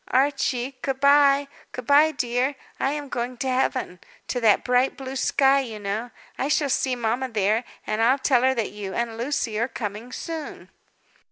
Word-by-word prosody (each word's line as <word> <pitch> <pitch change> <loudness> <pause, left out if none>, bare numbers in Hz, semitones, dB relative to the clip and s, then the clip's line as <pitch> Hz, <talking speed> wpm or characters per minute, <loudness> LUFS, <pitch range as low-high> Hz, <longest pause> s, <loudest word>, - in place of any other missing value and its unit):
"Archie, 265 -1 0
good 270 -1 -2
bye; 280 0 +5 0.3
good 250 - -6
bye, 290 +4 +6
dear, 255 0 -1 0.2
I 270 - +1
am 295 -1 -5
going 245 -1 -4
to 265 - -3
Heaven; 255 -7 -1 0.3
to 250 - -1
that 220 -4 +4
bright, 250 +1 +2
blue 270 0 -6
sky, 270 +1 +3
you 235 -5 -5
know. 210 +4 -3 0.3
I 270 - 0
shall 290 -2 +1
see 260 0 +1
mamma 240 +2 -1
there, 215 +1 +1 0.2
and 215 +1 -1
I'll 250 +4 +4
tell 265 -2 +2
her 260 +1 +3
that 230 -4 -2
you 200 -2 -6
and 235 -1 -2
Lucy 235 -3 -2
are 235 - +1
coming 220 0 -6
soon." 320 +2 -7
255 Hz, 180 wpm, -24 LUFS, 230-275 Hz, 0.3 s, bye